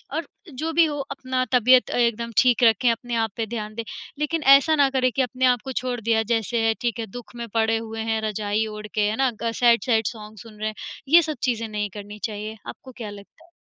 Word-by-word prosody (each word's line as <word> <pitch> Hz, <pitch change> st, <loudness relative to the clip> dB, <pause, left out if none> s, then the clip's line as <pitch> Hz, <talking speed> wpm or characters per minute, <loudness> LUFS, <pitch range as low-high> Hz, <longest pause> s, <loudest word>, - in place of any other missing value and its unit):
और 320 Hz, -1 st, -3 dB, 0.3 s
जो 315 Hz, +5 st, -3 dB
भी 335 Hz, +1 st, +5 dB
हो 295 Hz, -2 st, -3 dB
अपना 260 Hz, -2 st, -2 dB
तबीयत 250 Hz, +1 st, +5 dB
अ, -, -, -1 dB
एकदम 235 Hz, -1 st, 0 dB
ठीक 250 Hz, -2 st, +4 dB
रखें, 230 Hz, +1 st, +4 dB
अपने 235 Hz, +1 st, -4 dB
आप 225 Hz, -2 st, 0 dB
पे 225 Hz, -, -1 dB
ध्यान 215 Hz, -1 st, -5 dB
दें। 230 Hz, -, -4 dB, 0.4 s
लेकिन 305 Hz, +1 st, -1 dB
ऐसा 310 Hz, +3 st, +3 dB
ना 285 Hz, -2 st, +4 dB
करें 255 Hz, -1 st, +1 dB
कि 270 Hz, -, 0 dB
अपने 255 Hz, +1 st, 0 dB
आप 250 Hz, -2 st, +3 dB
को 265 Hz, -, -4 dB
छोड़ 250 Hz, -1 st, -2 dB
दिया, 225 Hz, 0 st, +2 dB
जैसे 225 Hz, +1 st, 0 dB
है 225 Hz, -, +3 dB
ठीक 235 Hz, -1 st, -1 dB
है, 225 Hz, -, -2 dB
दुःख 240 Hz, +3 st, -11 dB
में 235 Hz, -1 st, -6 dB
पड़े 225 Hz, 0 st, +2 dB
हुए 225 Hz, 0 st, -6 dB
हैं 220 Hz, 0 st, 0 dB
रजाई 215 Hz, 0 st, -1 dB
ओढ़ 210 Hz, 0 st, -7 dB
के, 215 Hz, -, 0 dB
है 215 Hz, -, -2 dB
ना? 265 Hz, +1 st, +2 dB
ग 230 Hz, -, 0 dB
सैड-सैड 235 Hz, -1 st, +4 dB
सॉन्ग 215 Hz, -1 st, -8 dB
सुन 215 Hz, +1 st, -13 dB
रहे 215 Hz, -, -2 dB
हैं, 215 Hz, -, -9 dB, 0.3 s
ये 335 Hz, +5 st, +7 dB
सब 310 Hz, -2 st, -4 dB
चीज़ें 230 Hz, -3 st, 0 dB
नहीं 210 Hz, -1 st, -3 dB
करनी 205 Hz, 0 st, -9 dB
चाहिए, 215 Hz, 0 st, -4 dB
आपको 260 Hz, -, -9 dB
क्या 225 Hz, -3 st, -6 dB
लगता 205 Hz, +10 st, -14 dB
है? 345 Hz, -, -26 dB
235 Hz, 240 wpm, -23 LUFS, 220-255 Hz, 0.4 s, ये